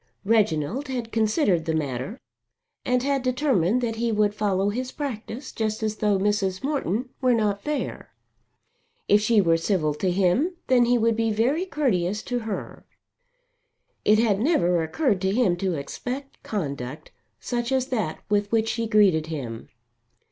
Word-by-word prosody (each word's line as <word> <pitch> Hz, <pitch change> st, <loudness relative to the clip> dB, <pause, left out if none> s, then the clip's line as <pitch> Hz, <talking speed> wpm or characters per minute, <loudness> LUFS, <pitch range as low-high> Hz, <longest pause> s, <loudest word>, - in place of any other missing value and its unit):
Reginald 215 Hz, -, +1 dB
had 245 Hz, -4 st, -4 dB
considered 215 Hz, -, +2 dB
the 160 Hz, -1 st, 0 dB
matter 145 Hz, -, -3 dB, 0.6 s
and 250 Hz, 0 st, +1 dB
had 275 Hz, 0 st, +1 dB
determined 250 Hz, -, +1 dB
that 225 Hz, -2 st, -2 dB
he 235 Hz, 0 st, 0 dB
would 210 Hz, -1 st, +2 dB
follow 200 Hz, -2 st, 0 dB
his 250 Hz, +4 st, -3 dB
practice 260 Hz, -2 st, -5 dB
just 220 Hz, 0 st, -2 dB
as 215 Hz, 0 st, -1 dB
though 210 Hz, -2 st, +2 dB
Mrs. 195 Hz, -1 st, 0 dB
Morton 265 Hz, -, -1 dB
were 255 Hz, -2 st, +4 dB
not 205 Hz, -3 st, 0 dB
there. 300 Hz, -1 st, -3 dB, 1.0 s
If 205 Hz, -, +5 dB
she 215 Hz, 0 st, +4 dB
were 165 Hz, -3 st, +3 dB
civil 165 Hz, -3 st, 0 dB
to 185 Hz, +5 st, -1 dB
him 200 Hz, -, +2 dB
then 245 Hz, -2 st, +4 dB
would 225 Hz, 0 st, +1 dB
he 225 Hz, 0 st, +2 dB
be -, -, 0 dB
very 265 Hz, -, +1 dB
courteous 210 Hz, -, 0 dB
to 245 Hz, -1 st, -2 dB
her. 220 Hz, -3 st, -6 dB, 1.2 s
It 215 Hz, -, +5 dB
had 215 Hz, -3 st, +2 dB
never 180 Hz, -, +2 dB
occurred 200 Hz, -, 0 dB
to 190 Hz, 0 st, +1 dB
him 225 Hz, -8 st, +3 dB
to 185 Hz, -1 st, -1 dB
expect 250 Hz, -, -6 dB
conduct 145 Hz, -, -5 dB, 0.3 s
such 240 Hz, 0 st, -3 dB
as 260 Hz, -1 st, +2 dB
that 215 Hz, -11 st, -2 dB
with 205 Hz, 0 st, 0 dB
which 225 Hz, -1 st, +2 dB
she 230 Hz, 0 st, -1 dB
greeted 195 Hz, -8 st, +4 dB
him. 125 Hz, -8 st, -6 dB
215 Hz, 155 wpm, -25 LUFS, 185-245 Hz, 1.2 s, If